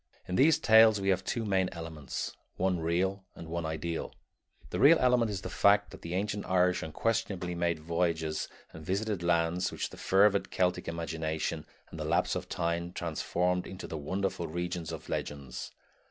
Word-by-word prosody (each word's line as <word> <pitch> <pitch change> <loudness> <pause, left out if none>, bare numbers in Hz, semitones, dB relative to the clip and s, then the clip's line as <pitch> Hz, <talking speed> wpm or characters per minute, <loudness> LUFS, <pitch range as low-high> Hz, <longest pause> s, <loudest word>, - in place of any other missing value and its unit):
In 90 - -4
these 150 +7 +5
tales 110 -1 +6
we 95 0 0
have 95 0 +2
two 115 +4 -2
main 95 -2 +2
elements, 80 -6 -5 0.2
one 90 -1 +1
real 95 +4 0
and 85 - -9
one 85 0 -3
ideal. 80 +1 -4 0.6
The 90 - -2
real 145 +8 +8
element 125 -3 +3
is 100 -2 -3
the - - -5
fact 100 0 +4
that - - -11
the 85 +1 -4
ancient 105 +1 -1
Irish 90 -1 +3
unquestionably 90 +1 -1
made 85 -1 0
voyages 80 -1 -1 0.3
and 80 - -9
visited 100 +2 -1
lands 85 +1 +1
which - - -4
the - - -11
fervid 100 +1 +3
Celtic 90 -1 0
imagination 80 -1 -3 0.2
and - - -8
the - - -2
lapse - - +1
of - - -4
time 85 +1 -2
transformed 90 +2 -1
into 95 0 -7
the - - -6
wonderful 90 +3 -2
regions 85 0 -3
of - - -7
the - - -9
legends. 70 -4 -4
90 Hz, 175 wpm, -30 LUFS, 85-100 Hz, 0.6 s, real